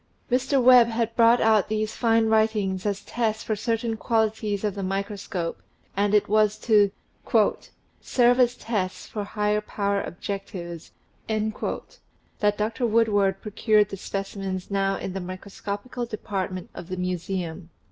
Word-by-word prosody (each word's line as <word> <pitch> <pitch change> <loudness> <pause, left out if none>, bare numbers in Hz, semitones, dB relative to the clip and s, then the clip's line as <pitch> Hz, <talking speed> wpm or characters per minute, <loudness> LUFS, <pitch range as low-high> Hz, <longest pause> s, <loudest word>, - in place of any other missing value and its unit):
Mr. 265 +2 +2
Webb 250 -1 +7
had 230 0 -1
brought 235 +1 +6
out 220 -3 +4
these 215 0 -1
fine 225 -1 +3
writings 215 -3 +1
as 200 -1 -2
tests 220 -2 -1
for 215 - -1
certain 225 +1 -1
qualities 220 -2 0
of 210 -2 0
the 200 - -5
microscope, 195 -2 -3 0.3
and 205 +1 +2
it 210 - +3
was 215 0 +3
to 210 -2 +4 1.1
"serve 245 0 +3
as 245 -1 +4
tests 200 -7 -3
for 210 - -5
high 210 0 0
power 200 -1 -1
objectives" 175 -3 -6 0.4
that 215 -1 -3
Dr. 225 +4 0
Woodward 205 -4 +2
procured 210 -1 +2
the - - -5
specimens 195 -1 -4
now 195 0 +1
in 185 - -5
the 195 - -4
micro 185 +2 -8
scopical 230 +5 -5
department 190 -4 -4
of 170 - -9
the 185 0 -5
Museum. 180 -1 -3
210 Hz, 140 wpm, -25 LUFS, 195-225 Hz, 1.1 s, Webb